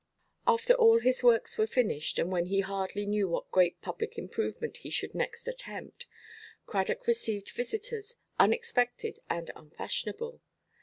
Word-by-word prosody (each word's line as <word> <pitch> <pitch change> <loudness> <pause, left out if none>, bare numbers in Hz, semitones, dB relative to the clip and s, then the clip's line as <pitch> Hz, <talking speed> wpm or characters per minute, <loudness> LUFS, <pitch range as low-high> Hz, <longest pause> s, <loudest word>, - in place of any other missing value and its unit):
After 470 +1 +5
all 455 -2 +7
his 255 - +2
works 245 - +4
were 435 - +4
finished, 210 - 0
and 175 - 0
when 175 -1 +1
he 195 +1 +2
hardly 195 +1 -3
knew 205 -2 +1
what 170 - -3
great 180 -2 +4
public 450 - -4
improvement 460 0 -3
he - - -9
should - - -2
next 475 0 -3
attempt, - - -6 0.6
Cradock 480 +1 -1
received 225 - 0
visitors, 440 - -4 0.2
unexpected 245 - +2
and 170 0 -2
unfashionable. 465 - -5
405 Hz, 140 wpm, -31 LUFS, -, 0.6 s, all